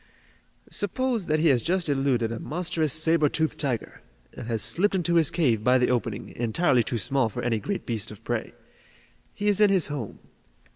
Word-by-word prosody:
"Suppose 230 0 -1
that 155 0 +1
he 165 - +4
has 125 -4 +3
just 180 +3 0
eluded 135 -5 0
a 115 - -4
monstrous 160 -2 -1
saber 155 0 +2
toothed 160 +1 -2
tiger, 130 -6 -3 0.3
and - - -8
has 115 -3 -1
slipped 180 - +1
into 175 -2 0
his 165 -4 +4
cave 120 -11 +1
by 125 +2 +4
the 125 0 +2
opening, 115 -3 -2
entirely 120 +3 +2
too 120 +1 -3
small 125 +2 0
for - - -6
any 115 -2 0
great 200 - -4
beast 115 -5 -2
of 105 +1 -12
prey. 120 -1 -3 0.8
He 205 - -3
is 205 0 +3
in 210 - +6
his 185 -6 +2
home. 120 -8 -6
140 Hz, 190 wpm, -26 LUFS, 115-170 Hz, 0.8 s, in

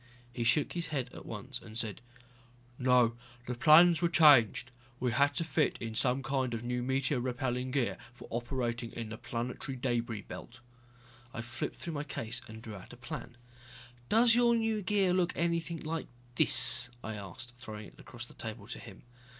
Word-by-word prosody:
He 120 - -2
shook 140 +5 +3
his 170 -1 -2
head 135 -5 -3
at - - -10
once - - -6
and 110 -1 -10
said, 110 -5 -4 0.8
"No, 125 -2 +4 0.3
the 125 - -3
plans 165 +6 +7
were 170 - +3
changed. 145 - +5 0.3
We 125 -1 0
had 140 +4 +2
to - - +1
fit 160 -5 +1
in 115 -1 -5
some 125 +3 +1
kind 130 -2 -1
of 115 - -5
new 125 0 -2
meteor 130 +1 0
repelling 125 0 -2
gear 130 -2 -1
for 125 - -13
operating 120 -1 -2
in 115 -2 -5
the 110 +1 -7
planetary 125 +3 -4
debris 120 -4 -1
belt." - - -10 0.8
I 115 - -4
flipped 120 - -5
through 170 - -6
my 145 -1 -3
case 120 -4 -4
and 110 0 -10
drew 110 - -7
out 95 +2 -11
a - - -12
plan. 120 0 -8 0.7
"Does 230 +1 +6
your 235 0 +4
new 225 -2 0
gear 195 -1 +2
look 180 -1 +1
anything 170 -1 -1
like 160 +1 -4 0.3
this?" 120 - +5
I 110 - -4
asked, 105 +4 -8
throwing 110 -3 -8
it - - -23
across - - -9
the - - -14
table - - -7
to - - -5
him. - - -12
125 Hz, 185 wpm, -32 LUFS, 120-155 Hz, 0.8 s, plans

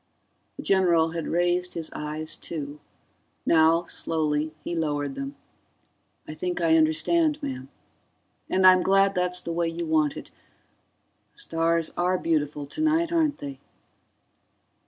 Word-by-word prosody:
The - - -7
general 170 -4 +3
had 165 -1 -4
raised 175 +1 0
his 165 -2 -4
eyes, 155 +1 -4
too; 150 -2 -7 0.7
now, 165 +1 +4
slowly, 155 -2 -1
he - - -4
lowered 145 -3 -1
them. 135 +1 -6 0.9
"I 155 - -6
think 180 +3 -3
I 165 -2 +3
understand, 290 - +2
ma'am. 130 0 -5 0.8
And 190 0 +2
I'm 185 0 +8
glad 195 +1 +3
that's 180 -1 0
the 170 - -4
way 170 0 0
you 170 +1 -4
want 155 -2 +1
it... - - -10 1.0
The - - -35
stars 165 0 0
are 180 +1 +1
beautiful 150 -4 -1
tonight, 315 - 0
aren't 315 -4 +1
they." 140 -2 -8
165 Hz, 135 wpm, -25 LUFS, 155-180 Hz, 1.0 s, I'm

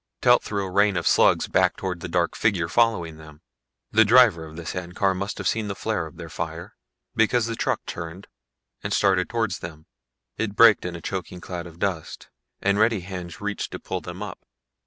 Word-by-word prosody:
Telt - - +5
threw 100 -2 -3
a 95 - -6
rain 100 0 +3
of 85 - -2
slugs - - +4
back - - +2
towards 90 -3 -4
the 90 - -4
dark 85 0 0
figures 90 -7 +1
following 90 -8 +2
them. 75 -1 -14 0.5
The 110 +1 +6
driver 110 -7 +5
of 80 - -12
the 85 0 -8
sand 90 0 -5
car 95 -1 +2
must 100 +2 -4
have - - -2
seen 110 -2 0
the 100 - -4
flare 95 -7 -2
of 80 - -15
their 85 -1 -7
fire, - - -6 0.4
because 115 +1 +3
the 115 0 -3
truck - - -1
turned 85 +3 -7 0.6
and - - -3
started 95 -3 +2
towards 110 -5 -1
them. 80 -2 -9 0.5
It 105 -2 -2
braked 110 -4 +6
in 90 -1 -4
a 85 - -8
choking 90 0 -5
cloud 85 -1 -6
of 85 -1 -13
dust 90 -4 -4 0.3
and 100 +1 +2
ready 110 -2 +3
hands 90 -2 -7
reached 105 0 -3
to - - -5
pull - - -4
them - - -7
up. - - -7
95 Hz, 205 wpm, -24 LUFS, 85-105 Hz, 0.6 s, The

